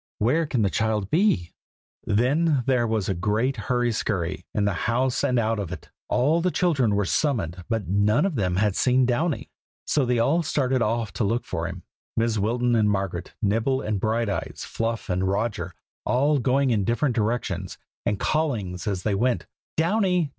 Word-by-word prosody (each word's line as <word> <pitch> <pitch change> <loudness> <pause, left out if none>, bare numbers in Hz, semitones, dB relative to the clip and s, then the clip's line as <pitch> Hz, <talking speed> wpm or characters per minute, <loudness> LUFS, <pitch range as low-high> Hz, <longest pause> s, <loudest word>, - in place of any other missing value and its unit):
Where 150 +9 +2
can 125 -6 0
the 100 - +1
child 110 -3 0
be?" 155 - +2 0.5
Then 135 +6 +2
there 125 -3 +2
was 110 -3 -1
a 95 - +1
great 110 +9 0
hurry 120 +1 0
scurry, 95 -5 -2
in 105 - 0
the 100 - +1 0.2
house 125 +2 +1
and 125 - +2
out 115 -1 +1
of 100 -5 -4
it. - - -8 0.2
All 150 +7 +2
the 180 - +1
other 180 - -2
children 135 - +2
were 100 -1 +1
summoned, 95 - -1
but 110 -6 -1
none 105 - +3
of 195 - 0
them 95 -8 0
had 100 0 +1
seen 130 0 +3
Downy: 145 +6 -1 0.3
so 145 - +2
they 125 -1 +1
all 140 +9 +3
started 135 -5 0
off 115 -1 0
to - - -1
look 115 +4 0
for - - -3
him, - - -7 0.4
Mrs. 115 -1 +1
Wilton 120 +4 +1
and 110 -2 +3
Margaret, 95 -3 -2
Nibble 115 +6 +1
and 105 -2 -2
Brighteyes, 110 -2 -1
Fluff 115 0 -3
and 90 0 0
Roger, 100 -3 -2 0.3
all 140 +4 +2
going 130 +1 +2
in 105 -4 +2
different 120 +6 +1
directions, 115 +1 -2 0.3
and 100 -1 -1
callings 115 - -1
as 95 -3 -2
they 105 - +1
went: 120 +5 +1 0.3
"Downy! 180 -1 +2
115 Hz, 185 wpm, -25 LUFS, 105-130 Hz, 0.5 s, none